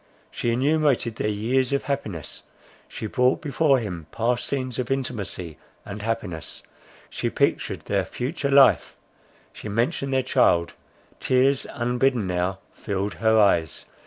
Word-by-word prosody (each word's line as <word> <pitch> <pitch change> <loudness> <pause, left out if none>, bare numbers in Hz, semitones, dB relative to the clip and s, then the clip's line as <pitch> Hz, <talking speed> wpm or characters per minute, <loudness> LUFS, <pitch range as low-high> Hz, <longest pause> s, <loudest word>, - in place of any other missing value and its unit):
She 120 - -2
enumerated 135 -3 +1
their 105 - 0
years 120 +5 0
of 140 - 0
happiness; 110 - -4 0.5
she - - -7
brought 125 +4 +2
before 145 -1 +2
him 90 -9 -5
past 120 +2 0
scenes 130 -3 -3
of 125 - -2
intimacy 105 - -3 0.3
and 100 +1 -7
happiness; 105 -8 -4 0.4
she - - -3
pictured - - 0
their - - 0
future 140 +2 -3
life, 140 -1 +5 0.6
she 105 - -8
mentioned 130 +6 -1
their 130 -1 +2
child—tears 130 +10 +1
unbidden 125 -1 0
now 90 +1 -1 0.2
filled 100 -1 -3
her 110 0 +2
eyes. 85 -6 +2
120 Hz, 130 wpm, -24 LUFS, 100-135 Hz, 0.6 s, life